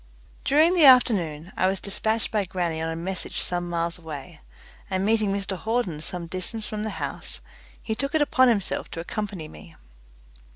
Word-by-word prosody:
During 310 Hz, +5 st, +5 dB
the 340 Hz, -5 st, +6 dB
afternoon 190 Hz, -, +5 dB
I 185 Hz, -, +2 dB
was 190 Hz, 0 st, 0 dB
dispatched 220 Hz, +3 st, -1 dB
by 210 Hz, -3 st, +1 dB
grannie 170 Hz, -3 st, -2 dB
on 160 Hz, -, -1 dB
a 165 Hz, -, -3 dB
message 180 Hz, +2 st, -3 dB
some 175 Hz, -1 st, -1 dB
miles 170 Hz, 0 st, -1 dB
away, 160 Hz, 0 st, -8 dB, 0.5 s
and 190 Hz, 0 st, 0 dB
meeting 215 Hz, -2 st, +2 dB
Mr 195 Hz, -1 st, -2 dB
Hawden 210 Hz, -6 st, -1 dB
some 175 Hz, +1 st, -4 dB
distance 185 Hz, +6 st, -4 dB
from 210 Hz, 0 st, -4 dB
the 215 Hz, -, -2 dB
house, -, -, -4 dB, 0.4 s
he 220 Hz, -, -2 dB
took 275 Hz, +6 st, -2 dB
it 315 Hz, -, +4 dB
upon 260 Hz, -3 st, +4 dB
himself 215 Hz, -6 st, 0 dB
to -, -, -6 dB
accompany 195 Hz, -2 st, -4 dB
me. 80 Hz, -, -13 dB
190 Hz, 175 wpm, -25 LUFS, 170-220 Hz, 0.5 s, the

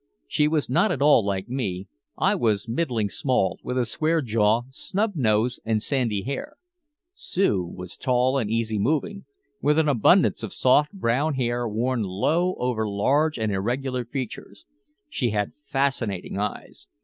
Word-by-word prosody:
She 150 Hz, -, +2 dB
was 155 Hz, -1 st, 0 dB
not 125 Hz, -, +2 dB
at -, -, -2 dB
all 145 Hz, -6 st, +6 dB
like 100 Hz, 0 st, -2 dB
me. 100 Hz, -7 st, -3 dB, 0.3 s
I -, -, +2 dB
was 110 Hz, -2 st, 0 dB
middling 115 Hz, -4 st, -1 dB
small, 125 Hz, -1 st, 0 dB
with 125 Hz, -, -4 dB
a 125 Hz, -, +2 dB
square 155 Hz, +7 st, 0 dB
jaw, 110 Hz, 0 st, +2 dB
snub 205 Hz, +10 st, -1 dB
nose 115 Hz, -2 st, +1 dB
and 110 Hz, -1 st, +1 dB
sandy 115 Hz, -4 st, -1 dB
hair. 135 Hz, +2 st, -5 dB, 0.6 s
Sue 195 Hz, -, 0 dB
was 90 Hz, +1 st, -9 dB
tall 130 Hz, +1 st, +1 dB
and 110 Hz, -5 st, -2 dB
easy 110 Hz, -1 st, -1 dB
moving, 160 Hz, -, -1 dB, 0.4 s
with 150 Hz, +1 st, +2 dB
an 160 Hz, -1 st, +3 dB
abundance 130 Hz, -7 st, +4 dB
of -, -, -5 dB
soft 145 Hz, +4 st, +3 dB
brown 145 Hz, -, 0 dB
hair 120 Hz, -1 st, -1 dB
worn 120 Hz, +3 st, -1 dB
low 155 Hz, -, 0 dB
over 115 Hz, -4 st, -1 dB
large 140 Hz, +10 st, +1 dB
and 110 Hz, -2 st, -1 dB
irregular 125 Hz, +6 st, -2 dB
features. 130 Hz, -, -7 dB, 0.4 s
She 125 Hz, -, -1 dB
had 105 Hz, -1 st, -1 dB
fascinating 120 Hz, -10 st, -1 dB
eyes. 105 Hz, -11 st, -5 dB
120 Hz, 155 wpm, -24 LUFS, 105-145 Hz, 0.6 s, all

